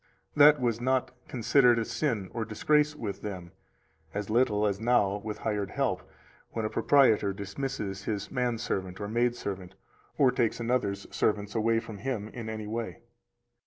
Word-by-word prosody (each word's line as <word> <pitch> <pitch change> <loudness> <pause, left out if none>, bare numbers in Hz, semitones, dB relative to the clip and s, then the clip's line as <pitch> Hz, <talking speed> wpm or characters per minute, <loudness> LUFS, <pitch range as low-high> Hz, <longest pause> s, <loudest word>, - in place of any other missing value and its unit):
That 150 0 +7
was 120 -2 0
not 130 +1 +1 0.2
considered 125 0 +4
a 115 - 0
sin 115 -12 -2
nor 115 - -2
disgrace 150 +7 +2
with 110 -9 -5
them; 90 -4 -6 0.6
as 105 +1 -3
little 105 -3 +3
as 100 -1 0
now 110 -4 +2
with 105 +1 -5
hired 105 -3 -2
help, - - -1 0.5
when 115 -1 -2
a 110 - -2
proprietor 110 -8 +4
dismisses 100 -1 -4
his 100 -2 -3
man 125 -2 0
servant 95 -5 -3
or 100 - -3
maid 120 +2 +1
servant, 95 -4 -6 0.4
or 130 -3 +5
takes 120 -3 0
another's 115 -5 -1
servants 105 -1 0
from 115 -1 0
him 110 -2 -3
in 115 -1 -7
any 110 -1 -5
way. 115 +2 -4
110 Hz, 160 wpm, -29 LUFS, 100-125 Hz, 0.6 s, That